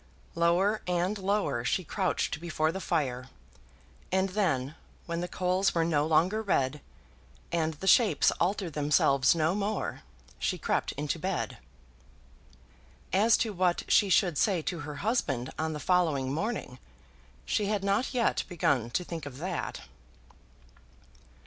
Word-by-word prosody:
Lower 175 Hz, +6 st, +2 dB
and 180 Hz, +3 st, 0 dB
lower 195 Hz, -, 0 dB
she 185 Hz, -, 0 dB
crouched 180 Hz, -3 st, -1 dB
before 160 Hz, -2 st, 0 dB
the 190 Hz, +3 st, -5 dB
fire; 130 Hz, -8 st, -1 dB, 0.8 s
and 190 Hz, +1 st, +2 dB
then, 155 Hz, -9 st, 0 dB, 0.3 s
when 170 Hz, 0 st, -3 dB
the 175 Hz, -, -2 dB
coals 185 Hz, +2 st, 0 dB
were 165 Hz, -1 st, +2 dB
no 150 Hz, -2 st, +1 dB
longer 175 Hz, +7 st, +2 dB
red, 145 Hz, -8 st, 0 dB, 0.7 s
and 160 Hz, -1 st, 0 dB
the 160 Hz, -, -8 dB
shapes 200 Hz, -, +5 dB
altered 185 Hz, -2 st, 0 dB
themselves 140 Hz, -1 st, +3 dB
no 160 Hz, +1 st, +1 dB
more, 205 Hz, +1 st, -2 dB, 0.4 s
she -, -, -1 dB
crept -, -, -1 dB
into 150 Hz, +3 st, -3 dB
bed. 185 Hz, +2 st, -3 dB, 1.5 s
As 215 Hz, +4 st, +5 dB
to 215 Hz, -, -4 dB
what 180 Hz, -1 st, +1 dB
she 205 Hz, -, +4 dB
should 175 Hz, -4 st, +3 dB
say 185 Hz, -6 st, +2 dB
to 175 Hz, +1 st, -3 dB
her 150 Hz, -1 st, -6 dB
husband 135 Hz, -, 0 dB
on 160 Hz, 0 st, -1 dB
the 150 Hz, -, -5 dB
following 150 Hz, -5 st, +1 dB
morning, 165 Hz, -, -3 dB, 0.7 s
she 210 Hz, -, 0 dB
had 205 Hz, -1 st, -1 dB
not 200 Hz, +6 st, +1 dB
yet 245 Hz, -3 st, +1 dB
begun 140 Hz, -, +1 dB
to 180 Hz, -, -1 dB
think 165 Hz, -4 st, -6 dB
of 130 Hz, -2 st, -9 dB
that. 180 Hz, +6 st, -4 dB
175 Hz, 140 wpm, -29 LUFS, 150-195 Hz, 1.5 s, shapes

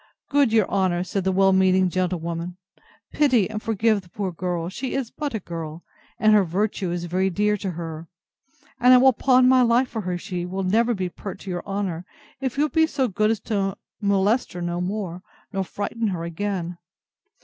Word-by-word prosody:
Good 280 Hz, -4 st, +3 dB
your 220 Hz, -4 st, +3 dB
honour, 185 Hz, -3 st, +1 dB
said 190 Hz, 0 st, -3 dB
the 190 Hz, -, +2 dB
well 195 Hz, +1 st, +4 dB
meaning 190 Hz, 0 st, +4 dB
gentlewoman, 175 Hz, -1 st, -2 dB, 0.5 s
pity 255 Hz, -9 st, +3 dB
and 215 Hz, 0 st, -5 dB
forgive 220 Hz, -1 st, +1 dB
the 180 Hz, -, -21 dB
poor 195 Hz, +1 st, -3 dB
girl; 175 Hz, -1 st, -3 dB
she 250 Hz, +8 st, -4 dB
is 265 Hz, -4 st, -2 dB
but 290 Hz, -5 st, -4 dB
a -, -, -1 dB
girl, 165 Hz, -2 st, -7 dB, 0.3 s
and 215 Hz, 0 st, +4 dB
her 210 Hz, -2 st, +6 dB
virtue 190 Hz, +1 st, -1 dB
is 175 Hz, 0 st, -3 dB
very 185 Hz, +2 st, 0 dB
dear 210 Hz, +3 st, +1 dB
to 195 Hz, -, -4 dB
her; 165 Hz, -1 st, -6 dB, 0.7 s
and 250 Hz, +1 st, +7 dB
I -, -, +8 dB
will 260 Hz, +1 st, +6 dB
pawn 255 Hz, +1 st, +4 dB
my 255 Hz, 0 st, +6 dB
life 245 Hz, +2 st, +3 dB
for 225 Hz, -, -4 dB
her, 180 Hz, -2 st, -2 dB
she 180 Hz, -1 st, -4 dB
will 190 Hz, +2 st, -3 dB
never 230 Hz, +5 st, +2 dB
be 185 Hz, -2 st, -2 dB
pert 190 Hz, +2 st, -8 dB
to 190 Hz, -, -6 dB
your 175 Hz, -1 st, -3 dB
honour, 195 Hz, -4 st, -2 dB, 0.4 s
if 265 Hz, -1 st, -3 dB
you'll 300 Hz, +1 st, +2 dB
be 320 Hz, +1 st, +3 dB
so 270 Hz, -5 st, 0 dB
good 215 Hz, +2 st, +1 dB
as 225 Hz, -1 st, 0 dB
to 200 Hz, -3 st, -1 dB, 0.2 s
molest 200 Hz, +4 st, +1 dB
her 175 Hz, -, -6 dB
no 175 Hz, 0 st, -2 dB
more, 185 Hz, -2 st, -3 dB, 0.3 s
nor 195 Hz, 0 st, 0 dB
frighten 210 Hz, +4 st, -3 dB
her 180 Hz, -4 st, -2 dB
again. 175 Hz, 0 st, -3 dB
195 Hz, 200 wpm, -24 LUFS, 180-225 Hz, 0.7 s, I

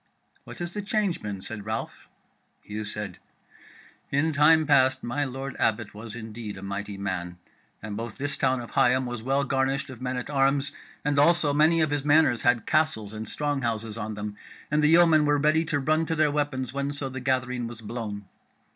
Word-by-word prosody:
"What -, -, -10 dB
has 175 Hz, 0 st, -4 dB
the 205 Hz, -, -3 dB
change 205 Hz, -3 st, 0 dB
been?" 100 Hz, -2 st, -5 dB
said 105 Hz, 0 st, -7 dB
Ralph. 110 Hz, +1 st, -5 dB, 0.5 s
Hugh 105 Hz, +1 st, -5 dB
said: 105 Hz, -3 st, -6 dB, 0.9 s
"In 155 Hz, +3 st, +1 dB
time 155 Hz, +2 st, +5 dB
past 130 Hz, -3 st, +4 dB
my 130 Hz, +5 st, -1 dB
Lord 135 Hz, +1 st, -5 dB
Abbot 110 Hz, -2 st, 0 dB
was 110 Hz, +1 st, -8 dB
indeed 110 Hz, -2 st, -7 dB
a 95 Hz, -, -9 dB
mighty 100 Hz, +1 st, -4 dB
man, 90 Hz, -3 st, -4 dB, 0.5 s
and 105 Hz, -2 st, -5 dB
both 115 Hz, 0 st, -5 dB
this 140 Hz, 0 st, -2 dB
town 130 Hz, -1 st, +1 dB
of 120 Hz, -, -9 dB
Higham 130 Hz, +1 st, +3 dB
was 120 Hz, -2 st, -5 dB
well 135 Hz, +4 st, +1 dB
garnished 135 Hz, +1 st, 0 dB
of 125 Hz, -2 st, -11 dB
men 130 Hz, 0 st, -2 dB
at 125 Hz, -, -5 dB
arms, 140 Hz, 0 st, +2 dB, 0.3 s
and 145 Hz, -1 st, +2 dB
also 155 Hz, -1 st, +4 dB
many 160 Hz, +3 st, +4 dB
of 155 Hz, -2 st, +1 dB
his 145 Hz, -2 st, 0 dB
manors 145 Hz, -6 st, +4 dB
had 120 Hz, -2 st, +2 dB
castles 140 Hz, -10 st, +1 dB
and 110 Hz, 0 st, -5 dB
strong 145 Hz, -2 st, -1 dB
houses 115 Hz, -2 st, -2 dB
on 110 Hz, -1 st, -4 dB
them, 105 Hz, 0 st, -5 dB, 0.3 s
and 150 Hz, 0 st, +3 dB
the 150 Hz, -, +5 dB
yeomen 165 Hz, -2 st, +6 dB
were 145 Hz, 0 st, +3 dB
ready 155 Hz, +3 st, +3 dB
to 155 Hz, -2 st, 0 dB
run 155 Hz, +3 st, +1 dB
to 165 Hz, -, 0 dB
their 155 Hz, -1 st, +3 dB
weapons 145 Hz, -4 st, -2 dB
whenso 140 Hz, 0 st, -2 dB
the 130 Hz, 0 st, -6 dB
gathering 125 Hz, -2 st, -1 dB
was 115 Hz, -1 st, -9 dB
blown. 105 Hz, -3 st, -5 dB
130 Hz, 195 wpm, -26 LUFS, 110-145 Hz, 0.9 s, yeomen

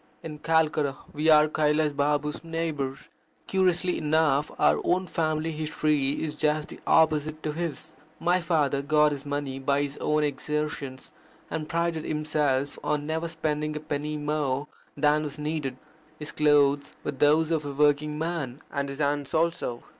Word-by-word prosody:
In 150 Hz, -2 st, -7 dB
Calcutta 155 Hz, -3 st, +2 dB, 0.2 s
we 150 Hz, +2 st, +1 dB
are 155 Hz, -1 st, +7 dB
Kailas 150 Hz, 0 st, +1 dB
Baba's 145 Hz, +2 st, 0 dB
neighbours. 160 Hz, -5 st, -3 dB, 0.4 s
Curiously 180 Hz, -1 st, +1 dB
enough 150 Hz, -2 st, +2 dB
our -, -, +3 dB
own 185 Hz, +1 st, +1 dB
family 160 Hz, -2 st, -1 dB
history 150 Hz, -2 st, 0 dB
is 155 Hz, -2 st, -3 dB
just 150 Hz, 0 st, 0 dB
the -, -, -9 dB
opposite 155 Hz, -1 st, +3 dB
to 155 Hz, -, -1 dB
his. 160 Hz, -3 st, -5 dB, 0.2 s
My 175 Hz, +2 st, +2 dB
father 150 Hz, -5 st, +1 dB
got 150 Hz, +1 st, +3 dB
his 145 Hz, 0 st, -5 dB
money 145 Hz, -2 st, -3 dB
by 140 Hz, +1 st, +1 dB
his 140 Hz, 0 st, -5 dB
own 150 Hz, 0 st, +1 dB
exertions, 145 Hz, -2 st, -3 dB, 0.4 s
and 155 Hz, -1 st, -3 dB
prided 170 Hz, -1 st, 0 dB
himself 150 Hz, -2 st, 0 dB
on 145 Hz, 0 st, -1 dB
never 160 Hz, +2 st, -2 dB
spending 155 Hz, -2 st, -2 dB
a -, -, -2 dB
penny 150 Hz, 0 st, -3 dB
more 145 Hz, -2 st, -1 dB, 0.3 s
than 150 Hz, +1 st, +3 dB
was 150 Hz, -1 st, -5 dB
needed. 150 Hz, -3 st, -3 dB, 0.4 s
His 150 Hz, -, -5 dB
clothes 145 Hz, -1 st, +3 dB
were -, -, -2 dB
those 150 Hz, +4 st, +3 dB
of 160 Hz, -2 st, +1 dB
a 145 Hz, -, -4 dB
working 150 Hz, +1 st, +2 dB
man, 155 Hz, -5 st, -3 dB
and 140 Hz, -1 st, -2 dB
his 140 Hz, -, -6 dB
hands 145 Hz, 0 st, -1 dB
also. 160 Hz, -7 st, 0 dB
150 Hz, 155 wpm, -27 LUFS, 145-155 Hz, 0.4 s, are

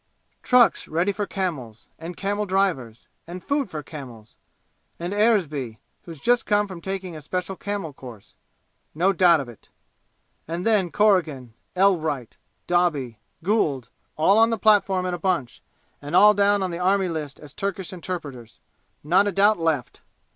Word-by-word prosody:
"Trucks 250 Hz, -2 st, +4 dB
ready 170 Hz, +5 st, 0 dB
for 200 Hz, 0 st, -4 dB
camels 140 Hz, -, -4 dB
and 165 Hz, +2 st, -8 dB
camel 205 Hz, +1 st, -2 dB
drivers 175 Hz, -, -1 dB, 0.2 s
and 180 Hz, +1 st, -8 dB
food 280 Hz, -5 st, -1 dB
for 155 Hz, -3 st, -6 dB
camels 125 Hz, -9 st, -11 dB, 0.6 s
and 175 Hz, +3 st, -4 dB
Eresby, 160 Hz, -, +1 dB, 0.3 s
who's 165 Hz, -4 st, -10 dB
just 245 Hz, -, +1 dB
come 205 Hz, -1 st, +2 dB
from 185 Hz, -3 st, -9 dB
taking 190 Hz, -2 st, -5 dB
a 155 Hz, -, -8 dB
special 180 Hz, +5 st, -4 dB
camel 200 Hz, -6 st, -5 dB
course. 120 Hz, -7 st, -12 dB, 0.6 s
Not 175 Hz, +5 st, +2 dB
a -, -, -3 dB
doubt 175 Hz, -3 st, +5 dB
of 135 Hz, -, -8 dB
it! 120 Hz, -3 st, -15 dB, 0.8 s
And 170 Hz, +3 st, -4 dB
then, 210 Hz, -6 st, +2 dB
Corrigan 165 Hz, -, +1 dB, 0.2 s
Elwright 160 Hz, -, +1 dB, 0.3 s
Doby 150 Hz, -10 st, 0 dB, 0.2 s
Gould 150 Hz, -, 0 dB, 0.3 s
all 195 Hz, +7 st, +4 dB
on 225 Hz, 0 st, +5 dB
the 225 Hz, -, -1 dB
platform 195 Hz, -3 st, +3 dB
in 180 Hz, -, -2 dB
a 175 Hz, -, -4 dB
bunch, 170 Hz, -10 st, -2 dB, 0.4 s
and 145 Hz, +1 st, -4 dB
all 210 Hz, 0 st, +7 dB
down 205 Hz, 0 st, +2 dB
on 185 Hz, -, -2 dB
the 170 Hz, -, -5 dB
Army 190 Hz, +1 st, +2 dB
List 155 Hz, -4 st, -5 dB
as 145 Hz, -2 st, -12 dB
Turkish 195 Hz, -2 st, -4 dB
interpreters! 150 Hz, -10 st, -7 dB, 0.4 s
Not 185 Hz, +7 st, +3 dB
a -, -, 0 dB
doubt 200 Hz, +1 st, +3 dB
left!" 160 Hz, -7 st, -2 dB
180 Hz, 160 wpm, -23 LUFS, 150-200 Hz, 0.8 s, all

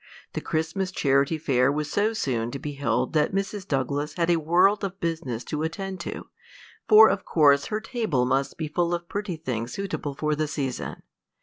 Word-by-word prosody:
The -, -, -3 dB
Christmas 160 Hz, +4 st, -2 dB
Charity 140 Hz, -2 st, +2 dB
Fair 135 Hz, -4 st, +2 dB
was 150 Hz, +1 st, -3 dB
so 210 Hz, +2 st, +2 dB
soon 120 Hz, -, -1 dB
to 140 Hz, -, -5 dB
be 145 Hz, +2 st, -5 dB
held 140 Hz, 0 st, -1 dB
that 155 Hz, +4 st, +2 dB
Mrs. 195 Hz, 0 st, -3 dB
Douglas 145 Hz, +2 st, -1 dB
had 170 Hz, 0 st, +1 dB
a 170 Hz, -, +4 dB
world 185 Hz, +6 st, +3 dB
of 195 Hz, 0 st, -4 dB
business 160 Hz, -8 st, -3 dB
to 150 Hz, -, -4 dB
attend 190 Hz, +4 st, -4 dB
to, -, -, -6 dB, 0.6 s
for 220 Hz, +1 st, +9 dB
of -, -, 0 dB
course 140 Hz, -3 st, +4 dB
her 215 Hz, -, -2 dB
table 220 Hz, -, -1 dB
must 135 Hz, +2 st, 0 dB
be 160 Hz, -, -3 dB
full 170 Hz, +3 st, 0 dB
of 170 Hz, 0 st, -7 dB
pretty 205 Hz, -2 st, -3 dB
things 125 Hz, -7 st, -4 dB
suitable 185 Hz, -8 st, -4 dB
for 150 Hz, +1 st, 0 dB
the 155 Hz, +1 st, -1 dB
season. 135 Hz, -4 st, -4 dB
155 Hz, 190 wpm, -25 LUFS, 140-185 Hz, 0.6 s, for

